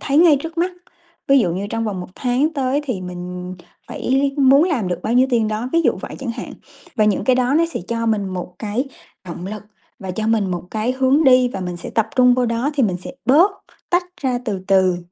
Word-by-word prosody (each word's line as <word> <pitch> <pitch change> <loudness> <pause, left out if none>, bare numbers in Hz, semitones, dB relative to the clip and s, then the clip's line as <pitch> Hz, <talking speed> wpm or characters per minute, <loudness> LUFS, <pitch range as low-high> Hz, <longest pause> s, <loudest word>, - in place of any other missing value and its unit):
thấy 280 +1 +1
ngay 325 -4 +6
trước 325 +1 -7
mắt, 360 +2 +1 0.6
ví 275 - +6
dụ 175 -6 +1
như 200 +2 -3
trong 225 0 -2
vòng 200 -4 -3
1 180 - -7
tháng 260 +5 0
tới 275 -1 0
thì 245 -9 -3
mình 180 0 -6 0.3
phải - - -7
lý 275 +1 +2
muốn 275 +2 +6
làm 270 - -1
được 175 -1 -3
bao 225 - -1
nhiêu 255 +2 +4
tiền 225 -3 +2
đó, 220 +4 -3
ví 335 - +4
dụ - - +3
vậy - - -7
chẳng 260 -4 -4
hạn. - - -7 0.4
Và 215 - +3
những 210 -2 +1
cái 255 -1 +3
đó 255 +2 +1
nó 330 - +4
sẽ - - -2
cho 230 0 -2
mình 205 -3 0
một 180 -1 -6
cái 220 +5 -2 0.4
động 175 +1 -7
lực 210 +1 -6 0.4
và 190 -1 -6
cho 215 +4 -3
mình 220 -4 +1
một 175 -1 -3
cái 220 +3 -1
hướng 265 +4 +2
đi, 255 -1 +6
và 195 -5 -6
mình 180 -1 -4
sẽ - - -8
tập 225 -1 0
trung 250 -1 +6
vô 250 -1 +1
đó 230 +5 0
thì 275 - +1
mình 185 -5 +1
sẽ - - -7
bớt, 320 +10 +5 0.4
tách 355 0 +2 0.2
ra 255 -3 0
từ 195 -5 -3
từ 185 -2 +4
235 Hz, 245 wpm, -20 LUFS, 195-270 Hz, 0.6 s, ngay